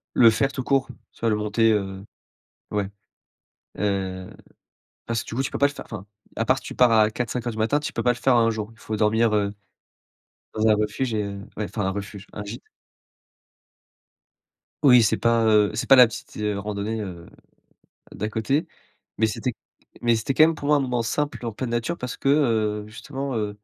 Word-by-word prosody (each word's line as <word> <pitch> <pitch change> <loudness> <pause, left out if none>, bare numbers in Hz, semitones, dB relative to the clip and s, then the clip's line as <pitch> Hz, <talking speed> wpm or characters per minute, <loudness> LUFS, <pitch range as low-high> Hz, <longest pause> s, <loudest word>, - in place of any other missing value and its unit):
Le 115 -2 +8
faire 135 +5 +1
tout 130 - -4
court, 135 0 +1 0.2
soit 115 - -2
le 105 - +2
monter, 105 +2 +2
heu, 95 -1 -3 0.7
ouais, 100 -2 -1 0.9
heu, 95 -2 -2 0.8
parce 115 -1 -2
que - - -22
du 115 - -6
coup, 135 - 0
tu - - -3
peux - - -3
pas 140 - +4
le - - -5
faire - - -9
enfin, 105 -4 -8 0.3
à 115 - -1
part 130 +3 +3
si - - -9
tu - - -7
pars 125 -2 +5
à 110 -1 +4
4:00-5:00 120 +1 -3
du 110 - -9
matin, 125 +7 +2
tu 150 - -5
peux 115 - -2
pas 125 - +4
le 120 - -10
faire 125 0 +3
en - - +5
1 - - +3
jour. 110 -1 -4
Il - - -24
faut 110 - -4
dormir, 110 +1 +2
heu, 100 -1 0 1.0
dans 110 0 +1
un 110 - +6
refuge 105 +4 -1
et 105 - 0
heu, 100 0 -6 0.2
ouais, 105 - -2
enfin 105 +3 -4
un 95 - +1
refuge, 100 0 -7
un 105 - -6
gîte. 105 +4 -7 2.2
Oui, 125 -4 +8
c'est 110 - +2
pas, 115 -1 +2
heu, 105 -2 +4
c'est - - -3
pas 135 - +10
la 125 - +9
petite, 115 - -8
heu, 105 -1 -1
randonnée, 105 +2 -3
heu, 85 -4 -7 0.9
d'à 105 - -4
côté, 110 +8 0 0.5
mais 110 - +4
c'était 125 +4 -2 0.5
mais 120 -1 +3
c'était 115 +4 -2
quand - - +5
même, 160 0 +5
pour 145 - -6
moi, 150 - +4
un - - +2
moment 125 -3 -1
simple 145 -1 -2
en 115 - -3
pleine 120 +3 -4
nature 120 +9 -1
parce 125 0 -5
que, - - -1
heu, 110 -7 +2
justement, 135 +4 -5
heu 105 -2 -2
110 Hz, 215 wpm, -24 LUFS, 105-125 Hz, 2.2 s, pas